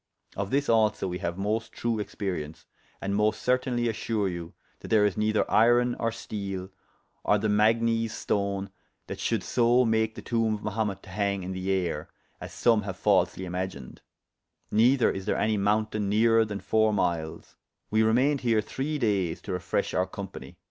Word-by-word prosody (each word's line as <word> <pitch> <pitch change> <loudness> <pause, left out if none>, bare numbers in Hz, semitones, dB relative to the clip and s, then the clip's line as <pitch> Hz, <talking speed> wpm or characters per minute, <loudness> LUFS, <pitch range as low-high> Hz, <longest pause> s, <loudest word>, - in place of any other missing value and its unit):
Of 100 0 -3
this 140 +3 +1
also 110 -3 +2
we 90 0 -4
haue 85 -3 -3
most 110 +4 -2
true 115 -2 -1
experience, 90 -7 -5 0.4
and 100 +1 -1
most 105 +1 +1
certaynely 125 -1 +1
assure 110 -2 -1
you 85 -2 -6 0.2
that - - -10
there 105 -2 +4
is 105 - +1
neyther 110 0 +1
iron 120 +2 +4
or 115 0 0
steele 100 -4 -5 0.5
or 105 - +3
the 110 +1 -1
magnes 115 +2 +2
stone 100 -2 -2 0.3
that - - -7
should - - -1
so 120 +1 +3
make 110 -1 +1
the - - -9
toombe 115 -2 +1
of 105 - -9
Mahumet 105 -2 -2
to 95 - -12
hange 100 -1 -1
in 90 - -5
the 95 +1 -4
ayre, 95 -3 -1 0.3
as - - -8
some 115 -3 +3
haue 100 -2 -4
falsely 95 0 +1
imagined; 90 -7 -5 0.7
neyther 120 +4 +4
is 95 -1 -6
there - - +1
any 110 0 +1
mountayne 105 0 0
nearer 115 +2 +4
than 105 -2 -5
foure 110 +2 +2
myles: 85 -6 -2 0.4
we 110 +1 +3
remayned 125 +6 +3
here 115 -3 +2
three 135 +8 -3
dayes 100 - 0
to 100 - -5
refreshe 90 -1 -2
our 90 +1 +1
company. 95 -9 -9
105 Hz, 175 wpm, -27 LUFS, 95-115 Hz, 0.7 s, there